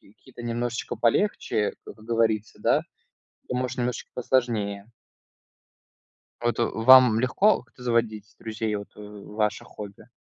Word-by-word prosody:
Какие-то 120 Hz, +4 st, -15 dB
немножечко 120 Hz, 0 st, -3 dB
полегче, 115 Hz, -, +1 dB
как -, -, -11 dB
говорится, 110 Hz, -1 st, -1 dB
да, -, -, +3 dB, 0.7 s
то, -, -, -3 dB
может, 125 Hz, 0 st, -2 dB
немножечко 125 Hz, -1 st, -3 dB
посложнее. 115 Hz, -6 st, 0 dB, 1.5 s
Вот 120 Hz, 0 st, 0 dB
вам 120 Hz, 0 st, +6 dB
легко 130 Hz, -, +3 dB
как-то 125 Hz, -, -18 dB
заводить 115 Hz, -3 st, -1 dB
друзей, 110 Hz, -1 st, -3 dB
вот, 100 Hz, -, -7 dB
э, -, -, -11 dB
ваше 105 Hz, +1 st, -3 dB
хобби? 100 Hz, -1 st, -11 dB
115 Hz, 115 wpm, -25 LUFS, 105-125 Hz, 1.5 s, вам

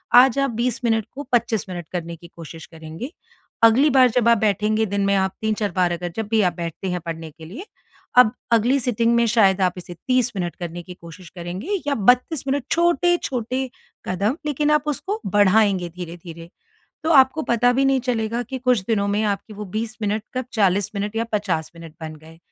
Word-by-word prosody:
आज 255 Hz, +1 st, +7 dB
आप 275 Hz, -1 st, +1 dB
20 245 Hz, +2 st, -2 dB
मिनट 225 Hz, -2 st, +1 dB
को 285 Hz, -, -7 dB
25 235 Hz, -3 st, +1 dB
मिनट 175 Hz, -3 st, -6 dB
करने 170 Hz, -1 st, -4 dB
की 170 Hz, +1 st, -14 dB
कोशिश 165 Hz, -1 st, -10 dB
करेंगे। 160 Hz, -, -9 dB, 0.5 s
अगली 240 Hz, +7 st, +6 dB
बार 255 Hz, -1 st, +6 dB
जब 235 Hz, 0 st, +2 dB
आप 235 Hz, -, +5 dB
बैठेंगे 215 Hz, +1 st, +1 dB
दिन 200 Hz, -1 st, -1 dB
में 200 Hz, 0 st, +2 dB
आप 190 Hz, 0 st, +1 dB
3-4 215 Hz, -2 st, -1 dB
बार 180 Hz, -2 st, +2 dB
अगर 175 Hz, 0 st, -4 dB
जब 220 Hz, -2 st, -3 dB
भी 220 Hz, -1 st, +4 dB
आप 180 Hz, -3 st, +2 dB
बैठते 170 Hz, +2 st, -4 dB
हैं 180 Hz, -, -2 dB
पढ़ने 165 Hz, -1 st, -6 dB
के 160 Hz, +1 st, -13 dB
लिए, 235 Hz, -, -9 dB, 0.5 s
अब 230 Hz, -3 st, +7 dB, 0.2 s
अगली 240 Hz, +4 st, +3 dB
सिटिंग 235 Hz, -1 st, +1 dB
में 235 Hz, -, +3 dB
शायद 200 Hz, -4 st, +3 dB
आप 180 Hz, -1 st, +2 dB
इसे 175 Hz, 0 st, -8 dB
30 255 Hz, -1 st, +2 dB
मिनट 175 Hz, -3 st, -3 dB
करने 175 Hz, 0 st, -6 dB
की 180 Hz, +1 st, -10 dB
कोशिश 170 Hz, +1 st, -12 dB
करेंगे 190 Hz, -, -4 dB
या 285 Hz, -, +1 dB
32 250 Hz, +7 st, +2 dB
मिनट 275 Hz, 0 st, 0 dB
छोटे-छोटे 270 Hz, -7 st, +1 dB, 0.4 s
कदम 200 Hz, -, 0 dB
लेकिन 295 Hz, 0 st, 0 dB
आप 300 Hz, -1 st, +3 dB
उसको 390 Hz, -, -3 dB
बढ़ाएँगे 205 Hz, -3 st, +3 dB
धीरे-धीरे। 170 Hz, -1 st, -9 dB, 0.6 s
तो 320 Hz, -, 0 dB
आपको 270 Hz, +3 st, +5 dB
पता 245 Hz, 0 st, +2 dB
भी 270 Hz, +2 st, +1 dB
नहीं 270 Hz, -1 st, +2 dB
चलेगा 230 Hz, 0 st, -1 dB
कि 260 Hz, +3 st, -6 dB
कुछ 250 Hz, -4 st, +2 dB
दिनों 200 Hz, -3 st, +1 dB
में 205 Hz, +1 st, 0 dB
आपकी 205 Hz, +1 st, -2 dB
वो 210 Hz, -, -6 dB
20 220 Hz, +4 st, -4 dB
मिनट 210 Hz, +1 st, -1 dB
कब 255 Hz, 0 st, -2 dB
40 200 Hz, -3 st, +1 dB
मिनट 205 Hz, +1 st, -3 dB
या 230 Hz, -, 0 dB
50 185 Hz, -7 st, -1 dB
मिनट 165 Hz, -2 st, -11 dB
बन 155 Hz, -1 st, -7 dB
गए। 160 Hz, +1 st, -16 dB
215 Hz, 200 wpm, -22 LUFS, 180-250 Hz, 0.6 s, आज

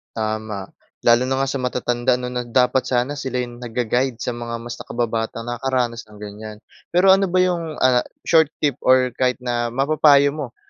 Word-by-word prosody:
Tama, 110 Hz, -2 st, -3 dB, 0.4 s
lalo 120 Hz, +2 st, +4 dB
na 130 Hz, -, 0 dB
nga -, -, -1 dB
sa 140 Hz, -, -3 dB
matatanda 125 Hz, 0 st, 0 dB
'no 125 Hz, 0 st, -5 dB
na 125 Hz, -1 st, -4 dB
dapat 125 Hz, +2 st, +2 dB
sana 130 Hz, +3 st, -1 dB
sila 130 Hz, -2 st, -5 dB
yung 120 Hz, -1 st, -9 dB
nagga-guide 125 Hz, +1 st, -1 dB
sa 125 Hz, +2 st, -4 dB
mga 120 Hz, 0 st, -5 dB
mas 120 Hz, 0 st, -7 dB
nakababatang 115 Hz, -1 st, -3 dB
nakakaranas 120 Hz, -1 st, -2 dB
ng 105 Hz, -1 st, -15 dB
ganyan. 105 Hz, +1 st, -8 dB, 0.3 s
Pero 185 Hz, +2 st, +4 dB
ano 195 Hz, 0 st, +4 dB
ba 180 Hz, -, -4 dB
yung, 170 Hz, -4 st, -2 dB
ah, 125 Hz, -1 st, +5 dB, 0.2 s
short 160 Hz, -2 st, +4 dB, 0.2 s
tip 145 Hz, -3 st, +1 dB
or 130 Hz, -1 st, +3 dB
kahit 125 Hz, -1 st, +2 dB
na 120 Hz, -1 st, -1 dB
mapapayo 140 Hz, +2 st, +4 dB
mo 140 Hz, -5 st, -7 dB
125 Hz, 180 wpm, -21 LUFS, 120-135 Hz, 0.4 s, ah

